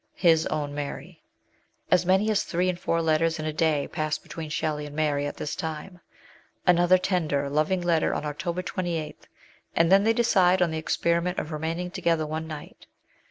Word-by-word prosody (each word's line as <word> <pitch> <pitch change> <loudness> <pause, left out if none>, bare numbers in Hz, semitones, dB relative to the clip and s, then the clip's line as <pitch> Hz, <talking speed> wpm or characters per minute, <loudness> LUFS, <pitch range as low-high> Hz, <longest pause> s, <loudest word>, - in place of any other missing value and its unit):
His 165 -3 +3
OWN 145 -1 -2
MART. 145 -1 -5 0.9
As 180 -1 +4
many 190 +4 +3
as 210 - +2
three 180 +1 0
and 180 -1 -3
four 165 -1 0
letters 160 +1 +2
in 155 - -4
a 155 - -2
day 155 -3 +1
pass 155 -2 -2
between 160 -2 -8
Shelley 150 -1 -2
and 145 - -10
Mary 145 -2 0
at - - -6
this 150 - -4
time. 160 +3 -6 0.7
Another 175 0 +5
tender, 160 -7 0
loving 155 +5 +1
letter 170 -2 +2
on - - -3
October 170 +4 -3
28, 175 -4 -4 0.5
and 165 +1 +3
then 195 +1 +6
they 225 +1 +3
decide 190 -6 +3
on 175 -2 +2
the 160 - -2
experiment 170 +3 0
of 155 - -3
remaining 165 +3 -3
together 170 -4 0
one 160 +1 -4
night. 155 -2 -10
165 Hz, 180 wpm, -26 LUFS, 155-180 Hz, 0.9 s, then